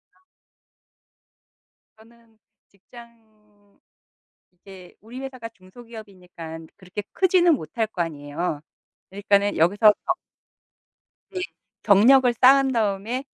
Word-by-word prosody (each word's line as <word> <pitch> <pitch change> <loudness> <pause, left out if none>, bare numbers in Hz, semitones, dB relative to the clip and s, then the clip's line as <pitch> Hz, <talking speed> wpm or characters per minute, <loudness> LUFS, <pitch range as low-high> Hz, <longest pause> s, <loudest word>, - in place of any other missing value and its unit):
아. - - -31 1.8
저는 225 0 -23 0.3
직장 210 -1 -20 0.7
이제 180 0 -15
우리 235 +4 -10
회사가 255 -4 -8
중소기업이니까 185 -6 -12 0.2
그렇게 190 +2 -8
크지는 355 -3 +3
못할 220 - -4
거 185 -5 -5
아니에요. 150 0 -4 0.5
그러니까는 200 +1 0
여기서 205 +6 +5
더 360 - +1 1.2
네. 370 - -4 0.4
"경력을 240 +5 +5
쌓은 270 +1 +5
다음에 225 +3 -2
215 Hz, 225 characters per minute, -23 LUFS, 190-240 Hz, 1.8 s, 여기서